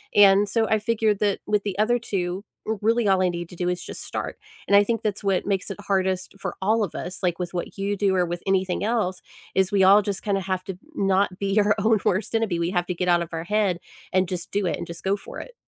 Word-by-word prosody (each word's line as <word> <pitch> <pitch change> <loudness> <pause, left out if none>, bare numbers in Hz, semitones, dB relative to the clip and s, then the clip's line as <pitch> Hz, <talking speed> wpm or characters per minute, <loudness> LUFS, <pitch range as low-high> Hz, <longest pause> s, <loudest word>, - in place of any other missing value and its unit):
And 200 0 +7
so 225 +1 +2
I 220 - +2
figured 215 -1 +1
that 205 -2 +1
with 210 -1 +1
the 200 -2 -3
other 240 +3 +2
two, 190 -2 -3 0.2
r 220 -1 -1
really 230 +1 +2
all 190 -1 +4
I 185 - +3
need 175 -1 -5
to 175 - -11
do 175 +1 -2
is 180 0 -2
just - - -7
start. - - -5 0.3
And 200 - +4
I 205 - +7
think 230 +1 -1
that's 210 0 -2
what 195 -2 +1
makes 195 -1 -1
it - - -6
hardest 190 -1 -1
for 190 - -4
all 215 +3 +2
of 185 - -4
us, 185 +1 -5
like 175 -2 +1
with 175 0 -4
what 175 +3 -4
you 200 +1 -1
do 195 -1 +2
or 180 - +3
with 175 0 -5
anything 190 -1 +1
else, 210 -5 0 0.3
is 190 0 +2
we 195 -2 +4
all 200 +2 +7
just 195 -3 -3
kinda 200 -2 0
have 185 0 -2
to 190 -3 -6 0.2
not 195 -3 +1
be 200 +1 +1
our 210 0 +3
own 220 +1 +3
worst 195 +5 0
enemy. 215 -7 +1
We 170 - 0
have 175 -2 0
to 180 - -1
get 180 +1 -2
out 175 0 +4
of 165 - -9
our 165 0 -3
head 200 -3 +1 0.3
and 185 -1 +3
just 180 -1 -5
do 200 -1 0
it, - - -1
and - - -5
just 170 -1 -9
go 195 +1 +1
for - - -9
it. - - -9
195 Hz, 270 wpm, -24 LUFS, 180-210 Hz, 0.3 s, And